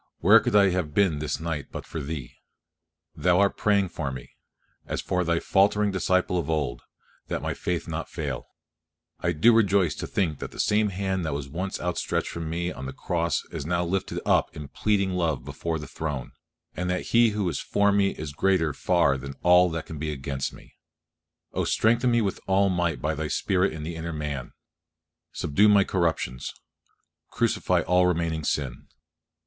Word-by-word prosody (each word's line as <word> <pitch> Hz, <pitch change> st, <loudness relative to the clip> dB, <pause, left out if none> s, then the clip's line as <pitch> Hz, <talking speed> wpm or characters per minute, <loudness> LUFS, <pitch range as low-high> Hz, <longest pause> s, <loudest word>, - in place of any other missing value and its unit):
where -, -, +7 dB
could -, -, -1 dB
I 100 Hz, -2 st, +6 dB
have 90 Hz, -5 st, -2 dB
been 95 Hz, -7 st, +3 dB
this 75 Hz, -, -2 dB
night 80 Hz, -3 st, -3 dB
but -, -, -6 dB
for 80 Hz, -, -5 dB
Thee? 70 Hz, -4 st, -6 dB, 0.8 s
Thou 90 Hz, +1 st, +2 dB
art 100 Hz, 0 st, +3 dB
praying 100 Hz, -3 st, +2 dB
for 75 Hz, -5 st, -4 dB
me, 65 Hz, -2 st, -9 dB, 0.6 s
as -, -, -2 dB
for 90 Hz, 0 st, 0 dB
Thy 85 Hz, 0 st, +1 dB
faltering 100 Hz, +2 st, +3 dB
disciple 95 Hz, -1 st, +1 dB
of 80 Hz, -, -4 dB
old, 75 Hz, -6 st, -1 dB, 0.5 s
that -, -, -3 dB
my -, -, -1 dB
faith 90 Hz, -2 st, -2 dB, 0.2 s
fail -, -, -3 dB
not. -, -, -11 dB, 0.8 s
I -, -, +3 dB
do 100 Hz, +10 st, +5 dB
rejoice 100 Hz, -7 st, +3 dB
to -, -, -4 dB
think 80 Hz, -7 st, -1 dB
that -, -, -5 dB
the -, -, -13 dB
same 105 Hz, 0 st, +2 dB
hand 95 Hz, -1 st, -2 dB
that 80 Hz, -4 st, -2 dB
was 70 Hz, -1 st, -4 dB
once 95 Hz, +4 st, -3 dB
outstretched 90 Hz, 0 st, -1 dB
for -, -, -6 dB
me 85 Hz, +2 st, -2 dB
on 65 Hz, -4 st, -7 dB
the 65 Hz, -, -6 dB
cross 85 Hz, -2 st, -1 dB
is -, -, -4 dB
now 85 Hz, +3 st, 0 dB
lifted 95 Hz, +3 st, -2 dB
up -, -, +2 dB
in 75 Hz, -2 st, -7 dB
pleading 100 Hz, -3 st, +1 dB
love 80 Hz, -8 st, -1 dB
before 80 Hz, +3 st, -3 dB
the 75 Hz, -, -7 dB
Throne, 75 Hz, -4 st, -5 dB, 0.4 s
and 90 Hz, 0 st, -2 dB
that 90 Hz, 0 st, -2 dB
He 115 Hz, 0 st, +6 dB
who 105 Hz, -3 st, -1 dB
is 85 Hz, -, -1 dB
for 100 Hz, 0 st, +2 dB
me 100 Hz, -1 st, +3 dB
is 75 Hz, -5 st, -6 dB
greater 85 Hz, -2 st, +2 dB
far 85 Hz, -6 st, +2 dB
than 70 Hz, +1 st, -7 dB
all 90 Hz, +1 st, +6 dB
that 80 Hz, -1 st, -4 dB
can 80 Hz, -, -8 dB
be 75 Hz, 0 st, -2 dB
against 65 Hz, -1 st, -3 dB
me! -, -, -16 dB, 0.8 s
Oh -, -, 0 dB
strengthen 120 Hz, +3 st, +2 dB
me 120 Hz, -1 st, +3 dB
with 100 Hz, -, -2 dB
all 95 Hz, +1 st, +3 dB
might 90 Hz, -2 st, -1 dB
by 75 Hz, +1 st, +1 dB
Thy 80 Hz, 0 st, -3 dB
Spirit 95 Hz, +4 st, +1 dB
in 80 Hz, -1 st, -6 dB
the 85 Hz, +2 st, -5 dB
inner 80 Hz, +1 st, -4 dB
man. 75 Hz, -5 st, -4 dB, 0.8 s
Subdue 100 Hz, +9 st, +3 dB
my 100 Hz, -1 st, +6 dB
corruptions, 80 Hz, -10 st, -1 dB, 0.8 s
crucify -, -, +1 dB
all 90 Hz, 0 st, +3 dB
remaining 80 Hz, -2 st, -1 dB
sin. 70 Hz, -4 st, -2 dB
85 Hz, 185 wpm, -26 LUFS, 75-95 Hz, 0.8 s, where